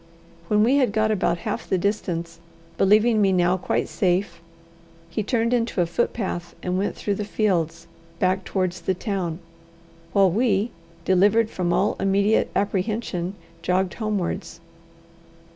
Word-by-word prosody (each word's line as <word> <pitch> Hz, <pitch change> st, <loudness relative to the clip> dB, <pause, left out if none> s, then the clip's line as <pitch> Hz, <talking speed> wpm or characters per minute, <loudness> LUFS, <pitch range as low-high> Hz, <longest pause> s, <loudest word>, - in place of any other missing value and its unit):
When 210 Hz, +2 st, +3 dB
we 255 Hz, +5 st, +4 dB
had 255 Hz, -7 st, +2 dB
got 215 Hz, 0 st, +2 dB
about 185 Hz, -4 st, +1 dB
half -, -, -3 dB
the 190 Hz, -, +2 dB
distance, 170 Hz, -4 st, -2 dB, 0.4 s
believing 215 Hz, +4 st, +4 dB
me 195 Hz, -1 st, +4 dB
now 180 Hz, 0 st, +3 dB
quite 185 Hz, -, -1 dB
safe, 185 Hz, -1 st, 0 dB, 0.7 s
he 215 Hz, -, -1 dB
turned 230 Hz, +2 st, 0 dB
into 230 Hz, -4 st, 0 dB
a 175 Hz, -, +4 dB
footpath 175 Hz, -1 st, -2 dB
and 180 Hz, 0 st, -1 dB
went 195 Hz, +2 st, -1 dB
through 205 Hz, -, -2 dB
the 210 Hz, -, -3 dB
fields 170 Hz, -6 st, -1 dB, 0.3 s
back 185 Hz, +1 st, +1 dB
towards 185 Hz, -2 st, -2 dB
the 185 Hz, +2 st, 0 dB
town; 185 Hz, -5 st, -3 dB, 0.7 s
while 195 Hz, -2 st, +4 dB
we, 220 Hz, +1 st, +1 dB, 0.3 s
delivered 205 Hz, +4 st, +3 dB
from 175 Hz, -2 st, -1 dB
all -, -, +1 dB
immediate 200 Hz, +2 st, +2 dB
apprehension, 200 Hz, -2 st, -1 dB, 0.3 s
jogged 185 Hz, +1 st, 0 dB
homewards. 210 Hz, -6 st, -3 dB
195 Hz, 140 wpm, -24 LUFS, 180-215 Hz, 0.7 s, we